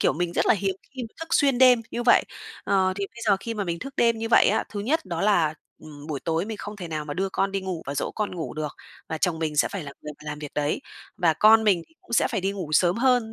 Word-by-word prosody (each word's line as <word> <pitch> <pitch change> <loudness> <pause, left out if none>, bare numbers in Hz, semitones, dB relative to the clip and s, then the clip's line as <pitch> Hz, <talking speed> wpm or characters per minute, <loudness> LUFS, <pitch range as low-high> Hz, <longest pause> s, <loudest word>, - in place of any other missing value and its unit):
kiểu, - - +3
mình 175 +1 -2
rất - - +1
là - - +5
hiếm 195 -1 -1 0.2
khi 260 - -5
mà 225 - -8
thức 325 - -6
xuyên 275 -4 +3
đêm 250 -2 +6
như 240 - -3
vậy. 240 - +5 0.4
Ờ, 190 -1 +2
thì 200 -1 -2
bây 235 - -11
giờ 200 -2 +5
khi 230 +2 -4
mà 205 -2 -2
mình 170 -1 -3
thức 275 +1 -8
đêm 230 -1 +3
như 225 0 -3
vậy - - +6
á, - - +1
thứ 205 - -5
nhất 285 +10 0
đó 170 -4 -4
là, 170 -7 +3 0.3
ừm, 150 -1 -11
buổi 145 -4 -4
tối 165 +1 -1
mình 220 0 -5
không 205 +1 -7
thể 180 -4 -7
nào 155 -2 -3
mà 145 -1 -5
đưa 190 +3 -1
con 195 0 -1
đi 195 - -1
ngủ 185 -3 -4
và 140 - -3
dỗ - - -2
con 210 -3 -2
ngủ 165 - -5
được, 155 -2 -3 0.4
và 160 - -3
chồng 170 -1 0
mình 155 -2 -2
sẽ - - +3
phải 200 - -5
là 140 -2 -8
người 150 - -6
mà 150 - -10
làm 150 - -6
việc 150 -1 -8
đấy. 150 0 0 0.4
Và 170 -3 +3
con 220 +3 +6
mình 190 -5 +3
thì - - -29
cũng - - -14
sẽ 235 - +3
phải - - -1
đi 195 +2 -1
ngủ 185 -6 -6
sớm 175 +4 +3
hơn, 245 -2 +2
190 Hz, 300 wpm, -25 LUFS, 160-225 Hz, 0.4 s, đêm